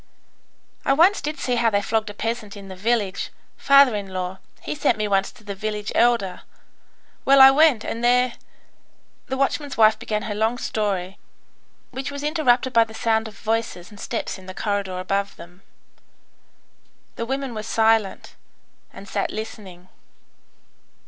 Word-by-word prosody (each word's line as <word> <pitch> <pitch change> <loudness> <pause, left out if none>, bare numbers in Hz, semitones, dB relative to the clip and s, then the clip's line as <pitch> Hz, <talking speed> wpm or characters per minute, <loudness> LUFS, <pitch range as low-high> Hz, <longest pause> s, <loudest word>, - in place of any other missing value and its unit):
"I 275 - +3
once 350 +8 +4
did 300 +1 -4
see 245 -1 -1
how 230 -1 +3
they 200 -2 +1
flogged 220 0 -1
a 205 - -9
peasant 225 -2 -4
in 195 -1 -10
the 190 - -8
village. 205 -1 -1 0.3
Father 275 -4 +5
in 200 -1 -4
law, 185 0 -4 0.2
he 145 - -3
sent 150 - +1
me 215 0 -1
once 195 -1 +1
to - - -19
the 205 -1 -5
village 210 +1 -4
elder. 230 -6 +2 0.8
Well, 275 0 +5
I 265 0 +10
went, 290 -5 +4
and 230 - -4
there... 250 0 +3 0.5
" - - -41
The 265 - -3
watchman's 275 +1 -1
wife 220 -1 +5
began 210 -1 -3
her 210 - -3
long 220 +3 0
story, 195 -6 -2 0.7
which 265 +1 -4
was 285 0 -6
interrupted 265 -5 +2
by 230 0 +6
the 220 0 -12
sound 220 -1 +1
of 210 - -12
voices 225 -5 -3
and 205 - -14
steps 225 -4 -4
in 185 - -15
the 185 - -8
corridor 200 -3 -2
above 195 +2 -2
them. 175 +2 -14 1.5
The 230 - -4
women 270 -1 -3
were 215 - -4
silent, 220 -2 +1 0.6
and 200 - -12
sat - - -2
listening. 195 -5 -8
220 Hz, 165 wpm, -23 LUFS, 200-245 Hz, 1.5 s, I